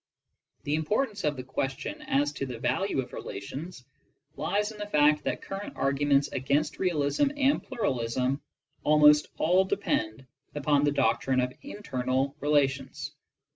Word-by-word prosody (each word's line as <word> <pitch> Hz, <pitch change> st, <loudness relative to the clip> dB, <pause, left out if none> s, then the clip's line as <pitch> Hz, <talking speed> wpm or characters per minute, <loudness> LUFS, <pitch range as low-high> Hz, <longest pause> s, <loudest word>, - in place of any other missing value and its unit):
The 145 Hz, -, -2 dB
importance 205 Hz, -, 0 dB
of 150 Hz, -2 st, 0 dB
the 130 Hz, -, -5 dB
question 135 Hz, +1 st, -4 dB
as 145 Hz, +2 st, +1 dB
to 140 Hz, -2 st, -4 dB
the 125 Hz, -2 st, -6 dB
value 130 Hz, -, 0 dB
of -, -, -15 dB
relations 130 Hz, -, -7 dB, 0.5 s
lies 205 Hz, +7 st, -1 dB
in 215 Hz, -, -12 dB
the 210 Hz, -, -4 dB
fact 150 Hz, -4 st, +4 dB
that -, -, -2 dB
current 195 Hz, +1 st, -6 dB
arguments 140 Hz, +1 st, +2 dB
against 140 Hz, +4 st, 0 dB
realism 175 Hz, -, +1 dB
and 280 Hz, 0 st, +3 dB
pluralism 130 Hz, -, -1 dB, 0.4 s
al 150 Hz, 0 st, +4 dB
most 150 Hz, 0 st, +6 dB
all 180 Hz, +4 st, +4 dB
depend 130 Hz, -, -1 dB, 0.3 s
upon 145 Hz, 0 st, +2 dB
the 145 Hz, -, +3 dB
doctrine 135 Hz, -2 st, +1 dB
of 125 Hz, 0 st, 0 dB
internal 135 Hz, -, -2 dB
relations. 140 Hz, -3 st, 0 dB
145 Hz, 140 wpm, -28 LUFS, 130-180 Hz, 0.5 s, most